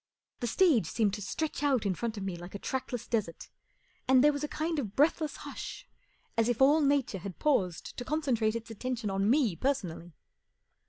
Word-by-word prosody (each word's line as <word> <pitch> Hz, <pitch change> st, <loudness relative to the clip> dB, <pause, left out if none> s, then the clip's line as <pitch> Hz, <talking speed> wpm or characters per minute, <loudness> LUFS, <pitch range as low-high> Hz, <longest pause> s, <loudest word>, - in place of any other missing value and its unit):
The 240 Hz, -, -2 dB
stage 270 Hz, -, +3 dB
seemed 210 Hz, -1 st, +1 dB
to 210 Hz, -, -4 dB
stretch 305 Hz, +11 st, -3 dB
out 270 Hz, -7 st, +2 dB
in 195 Hz, -, +2 dB
front 225 Hz, +4 st, -3 dB
of 200 Hz, -, -4 dB
me 190 Hz, -2 st, -3 dB
like 175 Hz, +3 st, -9 dB
a -, -, -2 dB
trackless 255 Hz, +1 st, -4 dB
desert, 205 Hz, -8 st, -2 dB, 0.6 s
and 260 Hz, 0 st, +6 dB
there 295 Hz, 0 st, +6 dB
was 285 Hz, +1 st, -4 dB
a -, -, 0 dB
kind 315 Hz, +1 st, -2 dB
of 210 Hz, -7 st, -4 dB
breathless 305 Hz, +1 st, +2 dB
hush -, -, -7 dB, 0.5 s
as 230 Hz, +1 st, +2 dB
if 240 Hz, -, 0 dB
all 290 Hz, +4 st, +6 dB
Nature 280 Hz, -8 st, +1 dB
had 185 Hz, 0 st, -7 dB
paused 190 Hz, -, 0 dB
to 245 Hz, -, -3 dB
concentrate 245 Hz, -7 st, 0 dB
its 230 Hz, 0 st, -5 dB
attention 230 Hz, -2 st, -3 dB
on 195 Hz, +2 st, +1 dB
me 245 Hz, -, +3 dB
personally. 175 Hz, -, -2 dB
235 Hz, 195 wpm, -30 LUFS, 200-285 Hz, 0.6 s, and